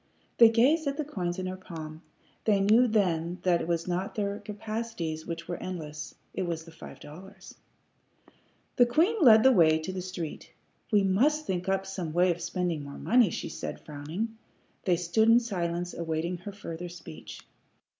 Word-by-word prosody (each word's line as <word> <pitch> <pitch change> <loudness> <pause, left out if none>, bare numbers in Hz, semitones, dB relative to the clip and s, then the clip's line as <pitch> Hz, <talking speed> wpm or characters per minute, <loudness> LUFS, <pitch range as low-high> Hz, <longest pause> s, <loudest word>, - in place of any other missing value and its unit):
They 230 -1 +10
gazed 275 +8 +3
at 280 0 -1
the 305 - -2
coins 180 -10 -3
in 185 - -3
her 185 0 -3
palm. 160 -4 -9 0.4
They 205 -3 +3
knew 220 +5 +5
then 180 -6 +1
that 175 -2 +3
it - - -4
was 170 0 -1
not 180 +2 -2
their 205 -1 -2
capacities 210 -6 -5
which 170 0 -5
were 175 - -3
endless; 155 -5 -6 0.2
it - - -3
was 165 -1 -3
the 165 - -13
five 165 - -11
dollars. 185 +7 -12 1.2
The 245 -2 +6
queen 335 - +2
led 220 -6 +8
the 265 - +7
way 160 -8 +5
to 160 +4 -5
the 185 - -4
street. 180 -4 -6 0.4
"We 205 -2 +4
must 280 +11 +2
think 180 0 -2
up 195 0 0
some 185 -5 -5
way 180 +1 +4
of 170 0 -4
spending 170 -3 -2
more 140 0 -8
money," 240 -4 +4
she - - -4
said, - - -6
frowning. 165 +10 -5 0.5
They 180 - +4
stood 180 +6 +2
in 230 +1 +7
silence, 175 -6 -3
awaiting 165 +1 -2
her 200 +3 -7
further 175 -3 -7
speech. 165 - -10
185 Hz, 180 wpm, -28 LUFS, 170-220 Hz, 1.2 s, They